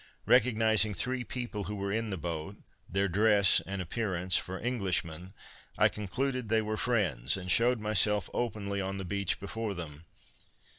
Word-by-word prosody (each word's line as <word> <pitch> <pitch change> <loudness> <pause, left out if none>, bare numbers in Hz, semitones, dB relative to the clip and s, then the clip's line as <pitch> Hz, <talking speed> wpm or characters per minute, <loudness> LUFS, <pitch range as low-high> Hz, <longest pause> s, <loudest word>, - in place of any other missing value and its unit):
Recognizing 110 -3 +3
three 125 +5 -1
people 120 -6 -5
who 105 - -4
were 100 0 -3
in 110 +1 -1
the 95 - -3
boat, 85 +3 -5 0.3
their 100 +2 +1
dress 100 +1 +4
and 95 -1 -3
appearance, 90 -2 -1
for 95 +1 -1
Englishmen, 95 -6 -2 0.4
I - - +5
concluded 125 +4 -3
they 110 0 +2
were 110 0 -2
friends, 90 - 0
and 90 -1 -3
shewed 120 +5 +4
myself 105 -2 +2
openly 100 -4 -2
on 95 +1 -3
the 95 - -4
beach 100 0 -1
before 105 +1 -4
them. 80 -2 -7
100 Hz, 155 wpm, -30 LUFS, 95-110 Hz, 0.4 s, I